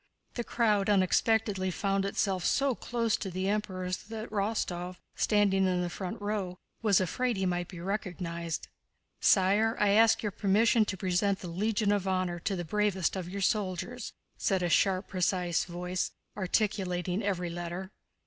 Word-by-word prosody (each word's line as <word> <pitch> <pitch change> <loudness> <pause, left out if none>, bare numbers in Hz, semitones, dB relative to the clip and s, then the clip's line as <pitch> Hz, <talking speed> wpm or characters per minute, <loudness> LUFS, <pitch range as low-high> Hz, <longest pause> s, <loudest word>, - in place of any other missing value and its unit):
The 240 - -3
crowd 210 -4 +1
unexpectedly 200 0 +2
found 195 +1 0
itself 195 -2 0
so 275 +6 +2
close 230 -1 -1
to 195 - -4
the 185 +1 -2
Emperors 185 -3 -1
that 220 +1 -7
Rostóv, 195 -4 -2 0.2
standing 200 -2 +3
in 180 -1 +1
the 175 - -3
front 190 +4 -5
row, 205 -3 -3 0.2
was 210 -4 +4
afraid 240 +5 0
he 190 - 0
might 175 -1 -1
be 180 - -9
recognized. 170 -3 -3 0.5
"Sire, 205 +4 +4
I 210 - +4
ask 225 +3 +5
your 210 - -1
permission 215 +3 +3
to 200 -2 -4
present 190 +2 +1
the 180 - -6
Legion 205 +4 +1
of 200 -2 0
Honor 185 -2 0
to 195 +3 -1
the 175 -1 -4
bravest 200 -1 +1
of 180 -2 -4
your 200 +2 -4
soldiers," 205 +4 -1 0.3
said 190 -2 +1
a 175 - +1
sharp, 190 +2 +2
precise 180 -2 0
voice, 180 +1 -2 0.3
articulating 190 -2 0
every 180 -4 -1
letter. 175 +2 -5
195 Hz, 160 wpm, -30 LUFS, 180-210 Hz, 0.5 s, ask